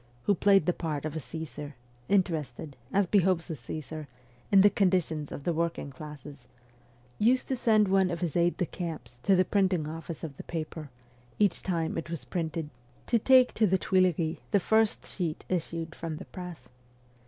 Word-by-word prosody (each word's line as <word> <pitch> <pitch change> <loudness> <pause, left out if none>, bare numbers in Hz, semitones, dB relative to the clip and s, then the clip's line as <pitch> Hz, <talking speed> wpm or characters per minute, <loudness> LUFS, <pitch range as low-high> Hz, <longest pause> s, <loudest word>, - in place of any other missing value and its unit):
who 205 - +3
played 195 -2 +4
the 180 - +2
part 155 -4 -3
of 155 0 -4
a - - -1
Csesar, 150 -1 -7 0.4
interested, 160 -6 0 0.2
as 200 0 +3
behoves 185 -2 +2
a - - -3
Caesar, 155 +4 -7 0.4
in 195 -1 +8
the 205 - +7
conditions 180 -6 +1
of 140 - -6
the 170 - 0
working 165 -3 -2
classes 145 -2 -10 0.7
used 245 +4 +3
to 265 - 0
send 220 -4 +3
one 190 -1 +3
of 170 -1 -3
his 170 -5 -2
aides 175 0 +2
de 180 - +1
camp 165 -7 -5
to 195 - +4
the 185 0 +4
printing 185 -6 +1
office 165 +1 -7
of 150 -4 -5
the - - -7
paper, 155 -2 -5 0.5
each 205 -3 +2
time 165 -3 -1
it 165 - -7
was 165 -7 -5
printed, 160 -3 -3 0.3
to 235 - +2
take 255 +2 +5
to 215 - +3
the 190 0 +3
Tuileries 180 -4 +1
the 205 - +3
first 220 +3 +2
sheet 170 -5 -3
issued 165 -2 -2
from 165 -2 -5
the - - -8
press. 180 -8 -9
170 Hz, 180 wpm, -29 LUFS, 155-190 Hz, 0.7 s, in